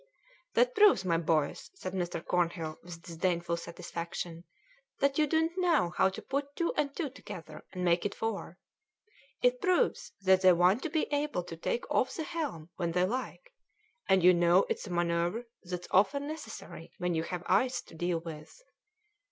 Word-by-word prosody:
"That -, -, +4 dB
proves, 415 Hz, -, +5 dB
my 165 Hz, -2 st, +2 dB
boys," 155 Hz, -3 st, 0 dB
said 185 Hz, -, -6 dB
Mr. 175 Hz, -3 st, -3 dB
Cornhill 170 Hz, -3 st, -1 dB
with 170 Hz, -1 st, -10 dB
disdainful 170 Hz, 0 st, -1 dB
satisfaction, 170 Hz, 0 st, -6 dB, 0.5 s
"that 280 Hz, +1 st, +2 dB
you 305 Hz, -, +4 dB
don't 320 Hz, +2 st, +2 dB
know 330 Hz, -, +2 dB
how 190 Hz, -, +4 dB
to 190 Hz, -, -8 dB
put 280 Hz, +1 st, -3 dB
two 340 Hz, -, 0 dB
and 285 Hz, -2 st, 0 dB
two 300 Hz, -7 st, -2 dB
together 195 Hz, -, -9 dB
and 180 Hz, -1 st, -3 dB
make 175 Hz, 0 st, +3 dB
it 205 Hz, -, -2 dB
four; 215 Hz, -5 st, -4 dB, 0.9 s
it -, -, +3 dB
proves 370 Hz, -3 st, +1 dB
that 190 Hz, -1 st, +5 dB
they 185 Hz, -1 st, +7 dB
want 180 Hz, +7 st, +4 dB
to 330 Hz, -, -3 dB
be 315 Hz, 0 st, +1 dB
able 290 Hz, -10 st, 0 dB
to 170 Hz, -, -8 dB
take 200 Hz, +8 st, -2 dB
off 260 Hz, -, +1 dB
the 320 Hz, -, -3 dB
helm 280 Hz, -, -4 dB
when 170 Hz, -2 st, -1 dB
they 180 Hz, +1 st, +3 dB
like, 260 Hz, -, -4 dB, 0.6 s
and 190 Hz, -2 st, +5 dB
you 180 Hz, +1 st, +8 dB
know 175 Hz, +2 st, +4 dB
it's -, -, -2 dB
a -, -, -7 dB
manoeuvre 175 Hz, +5 st, 0 dB, 0.2 s
that's 180 Hz, -1 st, -6 dB
often 280 Hz, +10 st, +3 dB
necessary 315 Hz, +1 st, -8 dB
when 180 Hz, -2 st, -1 dB
you 160 Hz, -, +1 dB
have 180 Hz, +1 st, -4 dB
ice 250 Hz, +7 st, +2 dB
to -, -, -17 dB
deal 175 Hz, +1 st, -1 dB
with." 160 Hz, -, -9 dB
185 Hz, 175 wpm, -31 LUFS, 170-280 Hz, 0.9 s, you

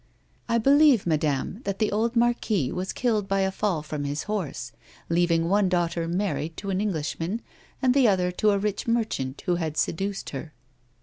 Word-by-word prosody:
" -, -, -37 dB
I 235 Hz, -, +3 dB
believe, 275 Hz, -1 st, +5 dB
madame, 155 Hz, -, 0 dB
that 200 Hz, -1 st, -2 dB
the 215 Hz, 0 st, +1 dB
old 225 Hz, +3 st, 0 dB
marquis 230 Hz, -, +1 dB
was 185 Hz, +1 st, -3 dB
killed 220 Hz, -5 st, 0 dB
by 195 Hz, 0 st, +1 dB
a 190 Hz, 0 st, +1 dB
fall 190 Hz, -6 st, -1 dB
from 150 Hz, -1 st, -4 dB
his 145 Hz, +2 st, -2 dB
horse, 175 Hz, -, -4 dB, 0.4 s
leaving 170 Hz, -1 st, +2 dB
one 200 Hz, +1 st, +3 dB
daughter 170 Hz, -2 st, 0 dB
married 170 Hz, -3 st, -2 dB
to 200 Hz, -, -4 dB
an 190 Hz, +1 st, 0 dB
Englishman, 175 Hz, +1 st, -2 dB, 0.4 s
and 255 Hz, -1 st, +4 dB
the 270 Hz, -3 st, +5 dB
other 180 Hz, -3 st, +2 dB
to 210 Hz, +4 st, +2 dB
a 200 Hz, -, +3 dB
rich 205 Hz, +2 st, -2 dB
merchant 220 Hz, -, -1 dB
who 175 Hz, -2 st, +1 dB
had 160 Hz, -3 st, -3 dB
seduced 195 Hz, +5 st, -2 dB
her." 150 Hz, +3 st, -7 dB
190 Hz, 185 wpm, -26 LUFS, 165-215 Hz, 0.4 s, believe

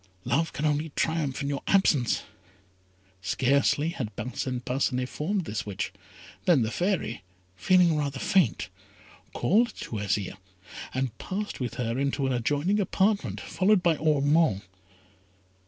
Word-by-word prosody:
Love 140 Hz, +7 st, +1 dB
can 150 Hz, -, -3 dB
only 150 Hz, +1 st, +1 dB
triumph 155 Hz, -4 st, -1 dB
in -, -, -2 dB
your 140 Hz, -1 st, -2 dB
absence." 155 Hz, -11 st, +3 dB, 1.0 s
Scarcely 140 Hz, -, +2 dB
had 125 Hz, -10 st, -5 dB
Parcin 125 Hz, +2 st, -3 dB
Parcinet 125 Hz, 0 st, -1 dB
formed 180 Hz, +7 st, -2 dB
this 110 Hz, -, -3 dB
wish, 100 Hz, -2 st, -4 dB, 0.5 s
than 165 Hz, -10 st, +5 dB
the 110 Hz, -, -2 dB
Fairy, 175 Hz, -, -1 dB, 0.3 s
feeling 175 Hz, -, +4 dB
rather 140 Hz, -2 st, -1 dB
faint, 175 Hz, -, +1 dB, 0.6 s
called 230 Hz, +6 st, +2 dB
to 110 Hz, -, -6 dB
Azire, 100 Hz, -1 st, -1 dB, 0.5 s
and 130 Hz, -3 st, -2 dB
passed 205 Hz, +2 st, -4 dB
with 120 Hz, -3 st, -3 dB
her 120 Hz, 0 st, -2 dB
into 140 Hz, 0 st, 0 dB
an 130 Hz, -, +1 dB
adjoining 145 Hz, -, +1 dB
apartment, 200 Hz, +1 st, +1 dB
followed 190 Hz, 0 st, +2 dB
by 170 Hz, -2 st, +4 dB
Ormond. 150 Hz, -, +2 dB
140 Hz, 130 wpm, -27 LUFS, 125-170 Hz, 1.0 s, than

